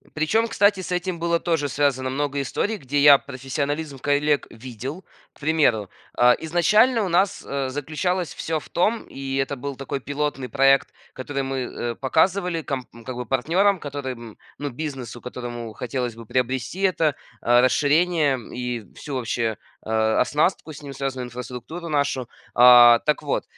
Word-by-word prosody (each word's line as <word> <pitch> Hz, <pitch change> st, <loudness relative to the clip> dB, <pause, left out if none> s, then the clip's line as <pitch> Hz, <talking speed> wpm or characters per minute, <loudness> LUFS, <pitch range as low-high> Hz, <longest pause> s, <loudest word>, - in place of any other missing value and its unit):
Причем, 220 Hz, +9 st, +1 dB
кстати, 205 Hz, -3 st, +3 dB
с 180 Hz, -, -6 dB
этим 180 Hz, -1 st, -2 dB
было 170 Hz, 0 st, +1 dB
тоже 160 Hz, -4 st, 0 dB
связано 130 Hz, -2 st, 0 dB
много 145 Hz, +1 st, -2 dB
историй, 205 Hz, -, -1 dB
где 145 Hz, -5 st, -3 dB
я 140 Hz, -1 st, +8 dB
профессионализм 140 Hz, +2 st, -4 dB
коллег 145 Hz, +1 st, +1 dB
видел. 130 Hz, -, -8 dB, 0.3 s
К -, -, -24 dB
примеру, 145 Hz, -9 st, +2 dB, 0.3 s
а, 125 Hz, 0 st, +6 dB
изначально 210 Hz, +9 st, +3 dB
у -, -, -2 dB
нас, 185 Hz, +3 st, +1 dB
э, 140 Hz, -1 st, -2 dB
заключалось 160 Hz, +6 st, -2 dB
всё 160 Hz, -1 st, -2 dB
в 145 Hz, -, -12 dB
том, 215 Hz, +7 st, 0 dB
и 135 Hz, 0 st, -5 dB
это 135 Hz, +1 st, -1 dB
был 140 Hz, +2 st, -6 dB
такой 135 Hz, +1 st, -4 dB
пилотный 140 Hz, -1 st, -3 dB
проект, 135 Hz, +1 st, +4 dB, 0.2 s
который 135 Hz, +1 st, -4 dB
мы, 135 Hz, 0 st, -3 dB
э, 120 Hz, -1 st, -4 dB
показывали 165 Hz, -, +1 dB
ком 130 Hz, -4 st, -4 dB, 0.2 s
как 130 Hz, -1 st, -5 dB
бы 125 Hz, -, -4 dB
партнерам, 175 Hz, -, +2 dB
которым, 130 Hz, -7 st, -6 dB, 0.2 s
ну, 145 Hz, -1 st, -3 dB
бизнесу, 130 Hz, -3 st, -6 dB
которому 120 Hz, -2 st, -6 dB
хотелось 125 Hz, -2 st, -3 dB
бы 115 Hz, -, -11 dB
приобрести 130 Hz, -, -2 dB
это, 165 Hz, -6 st, +2 dB, 0.3 s
а, 120 Hz, +1 st, +4 dB
расширение, 150 Hz, +2 st, +3 dB, 0.2 s
и 120 Hz, -5 st, -4 dB
всю 145 Hz, -, -7 dB
вообще, 115 Hz, -3 st, -1 dB, 0.3 s
а, 110 Hz, 0 st, +1 dB
оснастку, 155 Hz, +1 st, +1 dB
с 145 Hz, -, -11 dB
ним 140 Hz, -1 st, -8 dB
связанную 135 Hz, -2 st, -4 dB
инфраструктуру 125 Hz, +7 st, -7 dB
нашу. 140 Hz, -5 st, 0 dB, 0.3 s
А, 120 Hz, -1 st, +9 dB
так 150 Hz, -, +1 dB
вот, -, -, -1 dB
140 Hz, 160 wpm, -23 LUFS, 125-160 Hz, 0.3 s, А